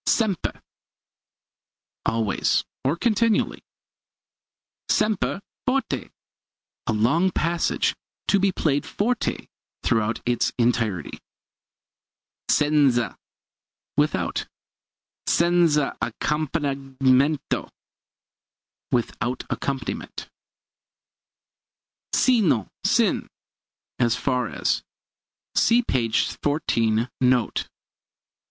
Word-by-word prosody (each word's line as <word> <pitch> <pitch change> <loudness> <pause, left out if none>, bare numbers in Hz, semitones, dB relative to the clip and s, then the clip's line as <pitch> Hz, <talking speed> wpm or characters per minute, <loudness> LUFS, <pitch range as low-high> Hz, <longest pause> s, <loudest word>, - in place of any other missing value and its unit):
Sempre 210 -7 0 1.4
always, 115 -2 +1 0.2
or 140 +5 +1
continually. 230 +1 +1 1.3
Sempre 210 -1 +1 0.2
forte 270 +2 0 0.8
a - - +2
long 125 - +3
passage 170 -1 0 0.3
to 200 - +4
be 195 0 +3
played 145 -5 0
forte 230 +3 -1 0.4
throughout 110 -1 +1
its 120 0 +1
entirety. 115 - 0 1.3
Senza 145 -5 +3 0.8
without. - - 0 0.8
Senza 170 -4 +3
accompagnamento 140 -2 0 1.2
without 120 +1 -1
accompaniment. 135 -1 -4 1.8
Sino, 200 - +3
sin - - +2 0.7
as 120 -2 +3
far 125 -2 0
as. - - 0 0.7
See 235 +2 +4
p. 120 - 0 0.3
14, 115 -6 +1
note. 125 -2 +2
140 Hz, 65 wpm, -24 LUFS, 120-175 Hz, 1.8 s, to